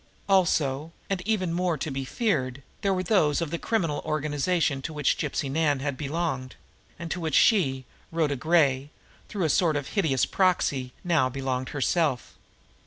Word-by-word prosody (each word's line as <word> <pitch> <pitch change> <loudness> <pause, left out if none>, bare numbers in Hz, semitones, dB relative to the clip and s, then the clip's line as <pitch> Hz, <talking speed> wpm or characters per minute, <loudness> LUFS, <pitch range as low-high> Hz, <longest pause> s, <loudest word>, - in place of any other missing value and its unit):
Also, 160 -6 +2 0.2
and 190 -2 0
even 185 -6 0
more 175 -2 0
to 155 - -4
be 135 0 -3
feared, 135 - -1 0.2
there 200 - +1
were 185 -1 0
those 165 -7 +2
of 165 -3 -3
this 170 - -2
criminal 165 -10 0
organization 150 0 0
to 155 - -5
which 150 -2 +1
Gypsy 140 - -2
Nan 150 -2 +1
had 140 -1 -2
belonged, 140 -3 -3 0.4
and 165 -1 -6
to - - -2
which 160 -4 -1
she, 135 - +3 0.3
Rhoda 160 -3 +1
Gray, 140 -2 +2 0.4
through 200 -4 -2
a 160 - +2
sort 160 0 +3
of 145 -1 -3
hideous 155 - +1
proxy, 145 -9 +1
now 165 -8 +2
belonged 130 -1 -3
herself! 145 -1 0
155 Hz, 165 wpm, -26 LUFS, 135-175 Hz, 0.4 s, she